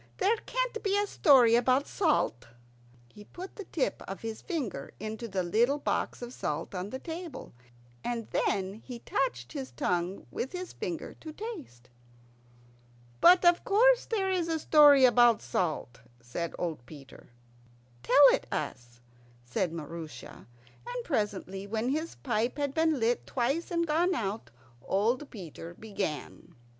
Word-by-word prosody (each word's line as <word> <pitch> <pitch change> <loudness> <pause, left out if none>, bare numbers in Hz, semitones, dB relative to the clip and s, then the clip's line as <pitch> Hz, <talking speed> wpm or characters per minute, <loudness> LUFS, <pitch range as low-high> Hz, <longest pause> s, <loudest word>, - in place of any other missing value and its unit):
"There 420 +5 +2
can't - - -1
be 400 -1 +1
a 410 - +2
story 270 - +5
about 255 +4 +3
salt." 300 - 0 0.7
He 210 - -12
put 365 - -10
the 405 - -8
tip 305 - -2
of 195 - -6
his 225 -1 -5
finger 255 - -4
into 220 +3 -5
the 190 -3 -1
little 235 +11 +2
box 290 - -2
of 240 +1 -7
salt 150 -3 -3
on 185 +1 -4
the 260 - -5
table, 330 -1 -7 0.5
and 235 -2 -3
then 190 -1 0
he 250 -2 -7
touched 130 - -2
his 130 -1 -5
tongue 175 +9 -2
with 265 - -4
his 365 0 -6
finger - - -5
to 315 - -7
taste. 310 - -8 1.3
"But 360 - +7
of 345 0 +5
course - - +4
there 390 -4 0
is 355 -3 0
a 325 -1 0
story 295 -3 +7
about 240 -2 +5
salt," 155 -8 -2 0.2
said 120 +9 -5
old 160 -7 -3
Peter. 140 -4 -13 0.7
"Tell 280 - +7
it - - -1
us," 120 -1 -5 0.4
said 160 +8 -1
Maroosia; 165 0 -8 0.4
and - - -4
presently, 200 - -2
when 220 +3 -1
his 315 +4 -2
pipe 235 0 -1
had 285 -2 -1
been 320 -2 +2
lit 235 +1 0
twice 270 +7 -1
and 335 -1 0
gone 340 +4 +2
out, 210 -4 -3 0.3
old 235 - 0
Peter 170 -4 -9
began. 195 -8 -5
240 Hz, 150 wpm, -29 LUFS, -, 1.3 s, But